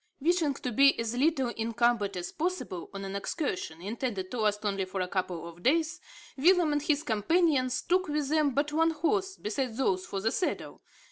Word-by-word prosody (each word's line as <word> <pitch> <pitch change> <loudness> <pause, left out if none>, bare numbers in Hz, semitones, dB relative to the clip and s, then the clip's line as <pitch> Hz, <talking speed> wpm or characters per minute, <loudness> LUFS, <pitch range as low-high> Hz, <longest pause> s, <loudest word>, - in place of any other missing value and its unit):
Wishing 320 -1 +2
to 250 - -4
be 275 +3 +5
as 230 +1 -2
little 270 -1 +2
encumbered 230 -3 0
as 175 0 -4
possible 330 - -3
on 195 0 -6
an 195 0 -5
excursion, 185 - -3
intended 205 -3 -3
to 245 - -3
last 210 0 0
only 195 -1 0
for 185 +1 -5
a 185 - 0
couple 180 -3 -3
of 170 +1 -12
days, 320 - +1 0.4
Willem 340 +1 +4
and 295 - +1
his 300 0 +1
companions 260 - +2
took 370 +1 +1
with 295 -2 -1
them 305 -1 +3
but 295 +1 0
one 325 +1 +3
horse, 380 +4 0
besides 225 +2 -3
those 190 -8 0
for 195 - -3
the 220 +3 0
saddle. 360 - -3
255 Hz, 190 wpm, -29 LUFS, 200-310 Hz, 0.4 s, be